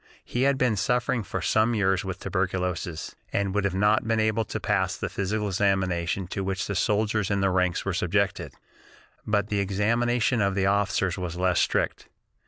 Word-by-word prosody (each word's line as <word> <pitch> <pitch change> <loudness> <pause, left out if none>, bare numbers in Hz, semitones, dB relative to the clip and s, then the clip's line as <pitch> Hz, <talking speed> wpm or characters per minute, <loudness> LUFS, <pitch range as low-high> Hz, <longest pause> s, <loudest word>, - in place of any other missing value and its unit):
He 120 - -2
had 140 - +1
been 125 -5 +1
suffering 120 +4 +1
for 100 - -5
some 110 +2 +2
years 95 -2 +1
with 95 -1 -4
tuberculosis, 90 -3 -2 0.2
and 100 -1 0
would 100 -1 +1
not 105 +3 +3
have - - -10
been 115 -1 +1
able 110 +1 +1
to - - -4
pass - - 0
the - - -3
physical 105 +2 -2
examination 95 -2 0
to 100 - -3
which 95 0 -2
the 100 - -3
soldiers 105 +1 +1
in 100 -1 0
the 95 0 +2
ranks 90 -1 0
were 100 - -1
subjected, 95 +2 -1 0.7
but 105 -1 +1
the 105 - 0
examination 115 +5 +1
of 100 -1 +1
the 95 -1 +1
officers 95 -2 +1
was 90 -2 -4
less 90 -1 +2
strict. - - 0
100 Hz, 185 wpm, -26 LUFS, 95-110 Hz, 0.7 s, not